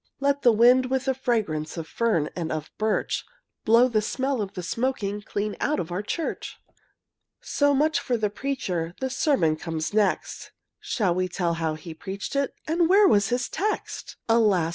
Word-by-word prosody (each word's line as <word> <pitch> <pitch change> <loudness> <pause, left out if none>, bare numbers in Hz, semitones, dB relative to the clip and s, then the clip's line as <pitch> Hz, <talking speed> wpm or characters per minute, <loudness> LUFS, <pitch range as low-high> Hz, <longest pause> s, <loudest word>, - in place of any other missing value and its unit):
Let 280 0 +1
the 240 - +6
wind, 245 +3 +5
with 265 0 -1
the 265 - +2
fragrance 210 - -1
Of 160 -1 -5
fern 215 -10 0
and 165 -3 -3
black 155 -1 -4
birch, 215 0 0 0.4
Blow 230 +3 +6
the 220 -4 +1
smell 260 +2 -1
of 195 -2 -4
the 180 - -5
smoking 210 -1 -2
Clean 205 0 -3
out 300 - +1
of 165 - -4
the 180 +3 -2
church! 315 +10 -4 0.8
So 285 -1 +2
much 305 +3 +2
for 245 - -1
the 210 -2 -1
preacher: 185 -10 -3
The 265 -1 -2
sermon 180 - +2
comes 160 +1 -4
next, 210 -3 0 0.3
Shall 195 -7 0
we 185 +1 0
tell 175 -1 -1
how 165 -2 -1
he 160 +1 -9
preached 195 - -6
it, 280 0 0
And 330 +1 +2
where 400 +2 +6
was 205 - +4
his 245 +1 0
text? 425 +2 -3
Alas! 210 -8 +3
215 Hz, 180 wpm, -25 LUFS, 175-265 Hz, 0.8 s, the